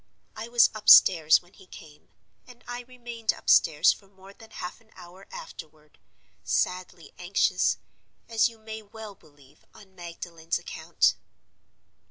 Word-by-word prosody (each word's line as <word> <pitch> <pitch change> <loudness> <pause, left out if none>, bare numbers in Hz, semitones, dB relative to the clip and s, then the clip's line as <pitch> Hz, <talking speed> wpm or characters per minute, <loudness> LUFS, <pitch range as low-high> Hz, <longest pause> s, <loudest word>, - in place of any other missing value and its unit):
I 220 - -7
was 235 0 +4
upstairs 175 -7 +6
when 175 - -25
he 190 - -19
came; 150 -4 -15 0.4
and 245 -1 -16
I 245 0 -6
remained 235 -3 -4
upstairs 150 -2 +3
for 195 - -19
more 195 0 -17
than 225 +2 -17
half 180 +1 -8
an 220 - -28
hour 185 +2 -15
afterward, 155 -2 -12 0.4
sadly 180 -2 -3
anxious, 180 +2 +1 0.5
as 230 0 +2
you 230 - -16
may 220 0 -9
well 215 0 -11
believe, 145 -5 -23
on 195 -2 -17
Magdalen's 170 -2 -6
account. - - 0
190 Hz, 135 wpm, -26 LUFS, 170-220 Hz, 0.5 s, upstairs